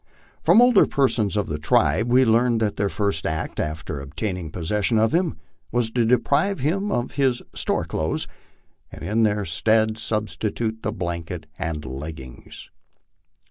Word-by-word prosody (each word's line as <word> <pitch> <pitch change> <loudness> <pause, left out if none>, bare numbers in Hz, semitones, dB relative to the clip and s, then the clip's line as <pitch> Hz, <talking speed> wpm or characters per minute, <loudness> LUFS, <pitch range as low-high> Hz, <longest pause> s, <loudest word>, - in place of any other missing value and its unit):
From 235 - +6
older 245 -5 +5
persons 115 -7 +1
of 105 - +1
the 75 -1 -4
tribe 110 +8 +2
we 130 +1 +5
learned 115 +1 +3
that 105 -2 0
their 100 -1 0
first 100 -6 -1
act 80 0 -3
after 75 0 -3
obtaining 85 +4 -4
possession 100 +7 0
of 110 0 +2
him 170 -1 +1 0.3
was 120 -2 0
to 120 -1 +1
deprive 145 - +2
him 195 +9 0
of 120 -7 -1
his 130 -3 0
" - - -44
store - - -1
clothes," 80 0 -2 0.6
and - - -10
in 110 +3 +1
their 105 -2 +1
stead 110 +5 +1
substitute 110 +1 -2
the - - -2
blanket 85 -1 -5
and 80 -5 -3
leggings. 65 -1 -9
110 Hz, 155 wpm, -23 LUFS, 85-120 Hz, 0.6 s, From